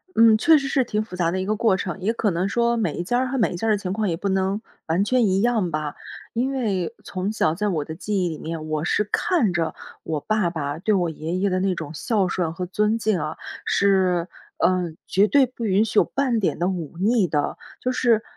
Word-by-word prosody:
嗯， 225 -1 +6
确 320 +7 +6
实 275 -1 -2
是 265 -1 +2
挺 215 -2 -1
复 195 -4 -9
杂 170 -2 +1
的 185 - -1
一 190 - -2
个 215 +1 0
过 220 -3 +3
程， 185 +1 -4
也 205 +5 0
可 215 -4 0
能 175 +3 0
说 235 +1 +2
每 220 - -1
一 175 - -3
家 245 +7 +1
儿 260 - 0
和 265 +1 -2
每 220 - +2
一 - - -4
家 225 +6 -2
儿 - - +4
的 210 - +3
情 185 -2 -4
况 215 -1 -1
也 165 - 0
不 200 +2 -2
能， 190 +2 0 0.3
完 170 +5 +2
全 250 +2 +2
一 190 +1 +2
样 225 -7 +1
吧。 155 -1 -3 0.4
因 255 +4 0
为， 215 -7 -1
从 190 +2 -3
小 160 -7 +1
在 210 +4 -1
我 160 -7 -1
的 160 - -6
记 195 +2 -2
忆 175 - 0
里 155 - -5
面， 160 -1 -5
我 155 0 -2
是 210 - +2
看 235 - +2
着， 165 -2 -1 0.3
我 155 -2 -2
爸 215 0 0
爸 150 -2 -4
对 210 +2 +1
我 175 -3 +1
爷 160 +2 -5
爷 195 +2 +1
的 185 0 0
那 190 -1 +1
种 160 -2 -6
孝 200 +2 0
顺 170 -2 -1
和 180 +1 -4
尊 210 +4 +1
敬 215 -5 0
啊， 155 +1 -4 0.3
是， 185 -3 +2 0.3
嗯， 180 -3 +1
绝 200 +3 +3
对 280 +1 +5
不 245 -2 -6
允 200 +1 +3
许 215 - +2
有 - - +5
半 260 -4 0
点 195 - 0
的 175 - 0
忤 170 -3 -4
逆 210 -1 +3
的， 145 -2 -1 0.2
就 255 - 0
是， 235 -3 +2
195 Hz, 270 characters per minute, -23 LUFS, 175-220 Hz, 0.4 s, 嗯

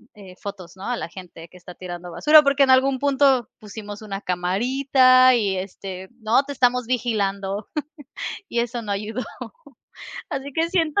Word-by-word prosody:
eh, 190 -3 -13
fotos, 190 -4 -8
¿no?, 190 - -10
a 245 - -1
la - - -5
gente 170 -2 -11
que 180 - -16
está 180 0 -12
tirando 175 -1 -8
basura, 300 - +6
porque 280 -1 +3
en 265 - +4
algún 260 +1 +4
punto 270 -3 +2
pusimos 210 -1 -9
una 200 -2 -6
camarita 255 +8 +4
y, 205 -5 0
este, 190 0 -7
no, 225 +3 +3
te 285 - -8
estamos 250 -2 +1
vigilando, 205 -5 -2 0.8
y 235 - -2
eso 240 0 -3
no 205 -2 -3
ayudó. 215 +5 -3 1.1
Así 275 +1 -5
que 325 +4 0
siento 335 0 +1
225 Hz, 165 wpm, -22 LUFS, 195-260 Hz, 1.1 s, basura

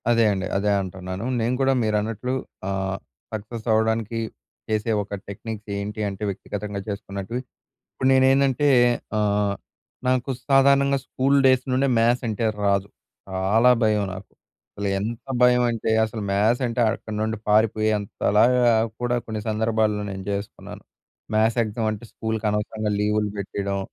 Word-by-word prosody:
అదే 115 -1 +4
అండి. 95 -1 -2
అదే 105 +1 +1
అంటున్నాను. 95 +2 -6
నేను 115 +3 +1
కూడా 135 0 +3
మీరన్నట్లు 110 +3 -1 0.4
ఆహ్, 95 0 -2 0.4
సక్సెస్ 110 +2 -6
అవ్వడానికి 110 0 +1 0.5
చేసే 110 +1 0
ఒక 100 - -10
టెక్నిక్ 110 +2 -6
ఏంటి 105 +1 -4
అంటే 100 +1 -7
వ్యక్తిగతంగా 100 +1 -5
చేసుకున్నట్టువి. 100 +3 -4 0.5
ఇప్పుడు 130 - 0
నేనేందంటే 135 +1 +4 0.5
ఆహ్, 105 -1 +1 0.5
నాకు 130 +1 +1 0.2
సాధారణంగా 140 0 +4
స్కూల్ 135 +2 +1
డేస్ 130 -1 +4
నుండే 135 +2 +2
మ్యాథ్స్ 120 +2 +2
అంటే 110 +1 -2 0.2
రాదు. 100 -1 +1 0.4
చాలా 100 +6 +3
భయం 105 -2 +2
నాకు. 95 +1 -10 0.5
అసలు 100 0 -2
ఎంత 110 +4 -4 0.2
భయం 125 0 +5
అంటే 115 -1 -2
అసలు 110 0 -5
మ్యాథ్స్ 110 +6 +2
అంటే, 120 +1 -2
అక్కడి 110 -1 -7
నుండి 110 +1 -1
పారిపోయేంత 110 -1 +2 0.3
లాగా 125 +2 +5 0.4
కూడా 120 0 0
కొన్ని 110 -1 -4
సందర్భాల్లో 110 -1 +1
నేను 95 -1 -6
జేసుకున్నాను. 100 0 -6 0.5
మ్యాథ్స్ 110 +2 +2
ఎగ్జామ్ 110 +1 -2
అంటే 105 +2 -7
స్కూలుకి 110 -1 -3
అనవసరంగా 105 +1 -2
లీవులు 105 0 +1
పెట్టేయడం. 100 0 -3
110 Hz, 135 wpm, -24 LUFS, 100-120 Hz, 0.5 s, భయం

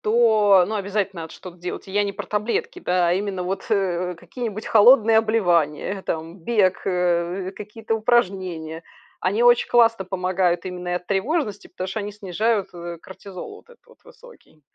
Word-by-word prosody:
то, 215 -4 +4
ну, 215 - -4
обязательно 200 -3 -2
надо 160 - -9
что-то 180 -1 -11
делать. 175 +1 -6
Я 200 +2 +1
не 200 -1 -2
про - - -7
таблетки, 210 +2 -2
да, 180 -1 +1
а 170 - +3
именно 195 -1 -2
вот, 190 +2 -4
э, 180 -3 0
какие-нибудь 215 +4 -6
холодные 225 0 +6
обливания, 190 -5 +1
там 165 +2 -4
бег, 190 0 +1
э, 180 +1 0
какие-то 215 +2 -5
упражнения. 185 -8 0 0.4
Они 205 +6 +1
очень 240 0 +5
классно 230 -4 +4
помогают 185 -1 0
именно 180 -1 -6
и 175 - -1
от 180 0 -3
тревожности, 210 - -1
потому 185 +1 -6
что 195 +4 -3
они 205 0 -5
снижают, 210 +1 -1
э, 170 0 -7
кортизол 190 - -10
вот - - -19
этот 485 - -21
вот 485 - -21
высокий. 485 - -18
195 Hz, 165 wpm, -23 LUFS, 180-220 Hz, 0.4 s, холодные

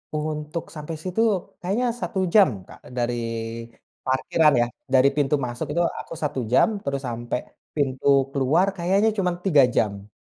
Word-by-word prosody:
Untuk 155 +1 -4
sampai 150 +1 -5
situ 185 +4 -1 0.4
kayaknya 205 +7 0
1 225 -4 -4
jam, 150 - +4
Kak, - - -14 0.2
dari 120 -1 0 0.9
parkiran 150 +4 +3
ya. 120 - +2 0.3
Dari 130 +1 +6
pintu 145 0 +2
masuk 125 +1 -3
itu 175 - +3 0.2
aku - - -8
1 150 -4 -2
jam, 200 - +3
terus 140 0 -3
sampe 120 -1 -3 0.4
pintu 135 -3 -1 0.2
keluar, 150 +9 +2
kayaknya 195 +5 +2
cuman 180 -2 +1
3 150 -8 +6
jam 100 -1 0
150 Hz, 145 wpm, -24 LUFS, 130-180 Hz, 0.9 s, Dari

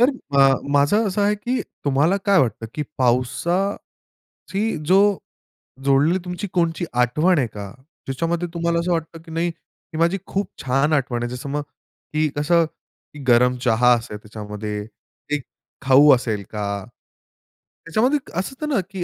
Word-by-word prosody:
तर 250 +3 +6 0.3
अ, 135 0 +6 0.2
माझं 145 +11 +3
असं 200 +2 0
आहे 205 +1 +3
की 245 +5 -2 0.2
तुम्हाला 145 +6 +3
काय 200 -1 +5
वाटतं 115 -2 -1
की 150 - -2 0.2
पावसाची 130 +11 0 0.9
जो 185 +4 +5 0.9
जोडलेली 145 +6 +3
तुमची 180 +3 -4
कोणची 170 -1 0
आठवण 140 +9 +3
आहे 125 - +1
का? 100 -3 -8 0.4
ज्याच्यामध्ये 165 +6 -1
तुम्हाला 170 0 0
असं 175 +2 -1
वाटतं 165 -1 -3
की 165 - -11
नाही, 165 +2 0
ही 165 0 -13
माझी 170 +3 +2
खूप 200 0 -1 0.2
छान 135 +4 +2
आठवण 125 -4 0
आहे. 120 - -2
जसं 130 +3 -7
मग 145 +1 -1 0.5
की 155 0 +2
कसं 165 +3 +3 0.6
गरम 125 +1 +5
चहा 120 +1 +4
असेल, 115 -3 -6
त्याच्यामध्ये 105 0 -6 0.6
एक 145 - -4 0.4
खाऊ 140 +3 +6
असेल 110 -4 -3
का? 100 -2 -3 1.0
त्याच्यामध्ये 240 - +2 0.2
असं 190 - -4
होतं 300 - -3
ना - - +3
की 190 -2 -3
150 Hz, 150 wpm, -22 LUFS, 125-175 Hz, 1.0 s, तर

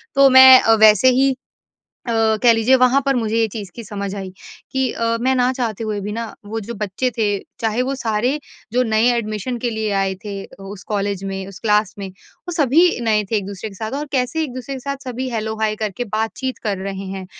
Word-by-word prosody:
तो 275 0 +6
मैं 260 0 +9
अ, 225 - +4
वैसे 215 +4 +6
ही 270 -1 +3 0.7
अ, - - 0 0.3
कह 235 -1 +7
लीजिये 225 +4 +4
वहाँ 255 +2 +4
पर 275 -1 +2
मुझे 225 -2 -1
ये 225 - +3
चीज़ 200 -3 -7
की 235 - -8
समझ 200 -1 -5
आई 190 -2 -6 0.4
कि 265 -2 0
अ, 230 0 -1
मैं 260 +2 +2
ना 250 0 +2
चाहते 230 -4 -3
हुए 210 -1 -3
भी 205 +1 -5
ना 230 0 -5
वो 225 +2 -4
जो 235 +3 -7
बच्चे 210 +6 -1
थे 215 -2 +2 0.3
चाहे 225 +2 0
वो 270 +2 -2
सारे 245 +3 -1 0.3
जो 250 +1 +2
नए 220 0 +2
एडमिशन 215 +2 -3
के 240 - -2
लिए 220 -1 -2
आए 195 -1 0
थे 205 -1 -5 0.2
उस 195 0 -9
कॉलेज 200 -2 -2
में, 195 -1 -4
उस 195 - -11
क्लास 210 -3 +1
में 195 -1 -5
वो 340 - -12
सभी 320 +1 +3
नए 215 -1 +2
थे 220 - +1
एक-दूसरे 200 +1 -5
के - - -13
साथ 220 +3 -5
और 300 - -3
कैसे 260 +5 0
एक-दूसरे 255 -1 -5
के 260 - -7
साथ 280 +1 -4
सभी 255 +1 -4
हेलो-हाय 220 -1 -2
करके 215 +2 -3
बातचीत 225 +4 -3
कर 205 -2 -1
रहे 195 0 -5
हैं। 190 -1 -6
225 Hz, 215 wpm, -19 LUFS, 205-255 Hz, 0.7 s, मैं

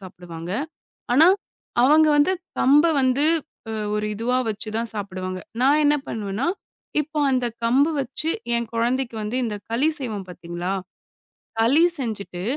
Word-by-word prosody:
சாப்பிடுவாங்க. 175 -2 -8 0.6
ஆனா, 305 +6 +7 0.6
அவங்க 305 +4 +6
வந்து 290 +6 +4 0.3
கம்ப 290 +5 +6 0.2
வந்து 260 +2 +2 0.5
அ - - -3 0.2
ஒரு 210 0 -1
இதுவா 235 +4 0
வச்சு 215 0 -4
தான் 230 0 -1
சாப்பிடுவாங்க. 185 -2 -4 0.2
நான் 280 +4 +5
என்ன 290 - +5
பண்ணுவேன்னா, 210 +2 -3 0.6
இப்போ 305 +1 -4
அந்தக் 245 -3 0
கம்பு 270 +7 +4
வச்சு 270 +4 -3 0.3
என் 235 -1 -2
குழந்தைக்கு 235 -1 -1
இந்த 215 -3 -2
களி 255 +7 +2
செய்வோம் 215 -7 -5
பாத்தீங்களா? 175 +1 -5 0.9
களி 265 +9 +5 0.2
செஞ்சுட்டு, 205 -7 -4
230 Hz, 130 wpm, -23 LUFS, 200-270 Hz, 0.9 s, ஆனா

